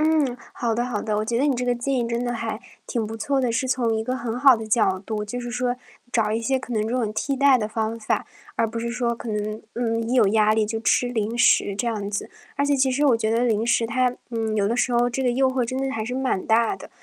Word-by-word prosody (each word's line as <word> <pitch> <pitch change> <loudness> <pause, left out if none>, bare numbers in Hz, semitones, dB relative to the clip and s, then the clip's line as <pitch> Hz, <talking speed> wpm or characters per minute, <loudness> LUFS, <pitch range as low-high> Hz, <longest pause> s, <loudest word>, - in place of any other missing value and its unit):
嗯， 305 -5 +2 0.2
好 235 -2 -1
的， 240 - +1
好 240 -4 -3
的， 215 -2 -1
我 215 - 0
觉 230 +1 -1
得 260 - +2
你 285 -3 +2
这 250 - -2
个 245 - +1
建 240 +3 -2
议 240 - 0
真 235 +1 -1
的 240 - -1
还 225 -2 -4 0.3
挺 230 -2 -1
不 220 +1 -5
错 270 +5 0
的， 250 -2 +1
是 230 +3 0
从 250 -3 +1
一 220 - -2
个 255 +2 -1
很 235 -1 -3
好 270 0 +7
的 220 - -6
角 215 -3 +2
度， 210 +1 -4
就 245 +4 -5
是 240 0 -5
说 245 0 -1 0.4
找 220 -3 +2
一 220 +1 0
些 265 +4 +1
可 255 -1 -6
能 220 - +1
这 - - -3
种 235 -4 -1
替 275 +6 -1
代 275 -1 +5
的 215 - -1
方 220 +1 -2
法， 215 - -1 0.3
而 - - +1
不 225 +1 -3
是 235 +1 -3
说 240 -1 0
可 235 0 -7
能， 215 0 -3
嗯， 230 -1 0
一 245 - 0
有 230 -6 +5
压 215 +1 +4
力 220 -1 +2
就 225 +1 -3
吃 235 +2 +2
零 225 -1 -2
食， 205 -4 +4
这 205 - -2
样 210 -3 -3
子。 205 0 -4 0.2
而 280 - 0
且 285 0 +2
其 265 -1 +2
实 285 +3 +1
我 250 -5 +5
觉 220 -1 -1
得 230 +1 +2
零 225 -2 +1
食 235 -1 +2
它 250 +2 +1 0.2
嗯， 225 -2 -2
有 200 -2 +1
的 235 - 0
时 245 0 +1
候 240 0 +3
这 245 - -3
个 245 - +2
诱 260 +1 +2
惑 260 -1 0
真 255 +2 -4
的 270 0 -1
还 220 -4 -3
是 250 +3 -4
蛮 260 -7 -1
大 230 - +3
的， - - -11
235 Hz, 310 characters per minute, -23 LUFS, 220-250 Hz, 0.4 s, 好